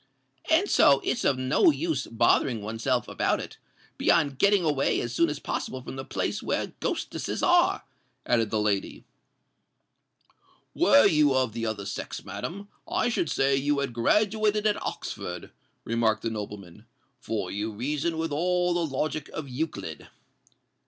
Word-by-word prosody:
"And 340 +6 +4
so 140 - +5
it's - - -1
of 135 - +2
no 130 - +3
use 325 +1 -1
bothering 115 0 +2
oneself 115 +4 -1
about - - 0
it—beyond 145 -5 -2
getting 200 -2 +4
away 145 -4 +1
as 120 0 -3
soon 165 +6 +2
as 150 - -3
possible 130 - -4
from - - -7
the 135 - -5
place - - -3
where - - -2
ghostesses - - -3
are," - - +3 0.4
added 115 -3 +2
the 110 - 0
lady. 105 -2 -1 1.7
"Were 115 - +5
you 150 -3 +4
of 130 -4 +1
the 115 0 -3
other 105 -2 -4
sex, 100 - -6
madam, 200 +4 -6 0.2
I - - +1
should 175 -9 -1
say 135 0 +2
you 145 +2 +1
had 140 -3 -2
graduated 210 - +2
at 210 -1 +1
Oxford," 90 0 -5 0.3
remarked 110 -1 +1
the 115 - -1
nobleman; 105 -1 -8 0.3
"for 105 -6 -3
you 105 +2 -3
reason 145 +9 -2
with 160 -1 -2
all 180 +3 +1
the 175 0 0
logic 155 +2 -3
of 155 -2 -6
Euclid." 125 - -5
135 Hz, 150 wpm, -27 LUFS, 110-165 Hz, 1.7 s, so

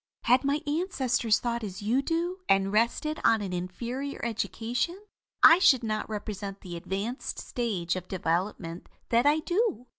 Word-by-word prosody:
"Had 250 +3 +4
my 280 +2 +1
ancestors 270 - +1
thought 235 -1 -2
as 195 -1 -6
you 240 +6 +2
do, 340 +5 -2
and 195 0 +3
rested 235 +8 +1
on 225 -1 +4
an 185 -2 -4
inferior 240 +10 -4
education, 240 - -2 0.4
I 330 +2 +9
should 265 -9 +5
not 215 -1 -2
represent 200 -2 -5
the 175 -3 -7
advanced 200 +9 -4
stage 200 -9 -2
of 185 -1 -6
development 170 -1 -2 0.2
that 235 +4 +3
I 305 +2 +4
do. 355 - 0
235 Hz, 150 wpm, -28 LUFS, 195-280 Hz, 0.4 s, I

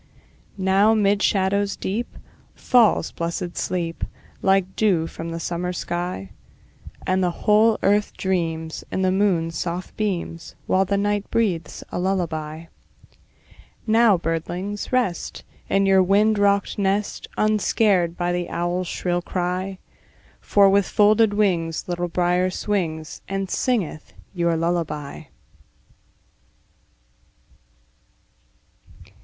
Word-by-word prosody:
Now 195 +3 +3
'mid 205 -1 +2
shadows 200 0 +1
deep 225 +5 -4 0.4
Falls 235 -9 +3
blessed 170 +1 -4
sleep, 170 -2 -3 0.4
Like 190 -1 +2
dew 185 -7 +2
from 165 0 -7
the 165 0 -4
summer 175 +2 -3
sky; 175 - -4 0.7
And 185 0 +1
the 180 - +2 0.2
whole 215 +1 +5
earth 205 +1 +2
dreams, 165 -4 -2
In 190 - -1
the 185 - +3
moon's 175 -5 +1
soft 175 +1 -4
beams, 180 -5 -3
While 190 0 +2
night 205 0 0
breathes 195 -8 -1
a - - -3
lullaby. 165 -4 -2 1.2
Now, 220 -3 +5
birdlings, 175 +5 -3
rest, 245 -9 -1 0.3
In 195 0 +3
your 190 -1 +5
wind 205 +3 +3
rocked 200 0 +2
nest, 200 +1 -1
Unscared 205 -4 +2
by 175 0 0
the 175 0 -2
owl's 175 +1 -2
shrill 175 0 -1
cry; 185 +2 -3 0.6
For 200 -1 +4
with 195 0 +3
folded 210 0 +4
wings 170 -6 0
Little 175 0 -2
Brier 180 +1 +1
swings, 170 -6 -3
And 195 -1 -3
singeth 200 - -1 0.2
your 170 -2 +1
lullaby. 160 -4 -2
185 Hz, 110 wpm, -23 LUFS, 170-205 Hz, 1.2 s, whole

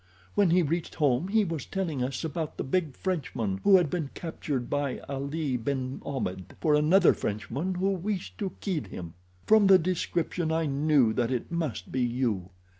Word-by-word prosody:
When 200 -3 +4
he 175 +1 +4
reached 165 +3 -2
home 145 +1 +2
he 215 +2 +3
was 165 -6 -3
telling 165 -9 -2
us 130 +3 -3
about 160 0 -3
the - - -2
big 155 -1 -1
Frenchman 120 - -2
who 195 -2 +7
had 170 -6 +1
been 160 -6 -2
captured 145 -6 -3
by 145 -2 -1
Ali 140 0 -2
ben 130 +2 -3
Ahmed 95 -10 -4
for 155 - +2
another 160 +5 +5
Frenchman 115 - -3
who 190 +2 +1
wished 195 +1 -3
to 195 -4 -2
kill 175 - -1
him. 85 -3 -8 0.3
From 215 -2 +6
the 190 -1 +8
description 170 -1 -1
I 160 0 +1
knew 140 -4 +3
that 120 0 0
it 125 +2 -3
must 160 - -3
be 130 - 0
you. 120 -7 0
150 Hz, 180 wpm, -28 LUFS, 130-180 Hz, 0.3 s, the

